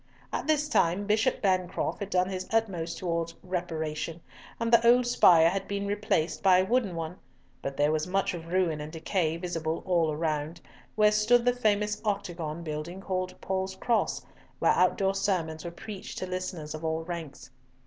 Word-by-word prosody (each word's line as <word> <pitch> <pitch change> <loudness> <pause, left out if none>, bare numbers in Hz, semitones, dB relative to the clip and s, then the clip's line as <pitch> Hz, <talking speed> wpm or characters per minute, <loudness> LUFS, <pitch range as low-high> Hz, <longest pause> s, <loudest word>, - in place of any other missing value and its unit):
At - - -2
this 300 -1 +2
time 185 - +2
Bishop 215 +2 +1
Bancroft 185 -2 0
had 200 -1 -4
done 185 -1 +2
his 185 -1 -4
utmost 180 -7 0
towards 170 -2 -2
reparation, 165 -3 -3 0.4
and 230 0 -1
the 235 0 +7
old 245 +1 +6
spire 170 -9 +6
had 195 +1 -3
been 200 0 -2
replaced 205 -5 0
by 190 -2 +6
a 185 - +3
wooden 220 -4 +1
one; 165 +2 -5 0.4
but 135 0 -5
there 145 +1 +3
was 155 +1 0
much 195 +1 0
of 165 -2 -7
ruin 170 -4 0
and 150 +1 -7
decay 165 0 -1
visible 165 -2 -3
all 170 -4 +2
around, 155 +1 -2 0.4
where 210 0 +5
stood 230 +3 +3
the 245 - +4
famous 210 -3 0
octagon 175 -6 -3
building 155 +3 -5
called 185 -1 -3
Paul's 190 0 -2
Cross, 235 +4 0 0.3
where - - +3
outdoor 190 +2 +2
sermons 175 -5 -1
were 170 - -4
preached 190 +3 -8
to - - -3
listeners 180 -4 -4
of 155 +1 -7
all 160 0 -1
ranks. 160 -7 -7
180 Hz, 175 wpm, -28 LUFS, 165-200 Hz, 0.4 s, the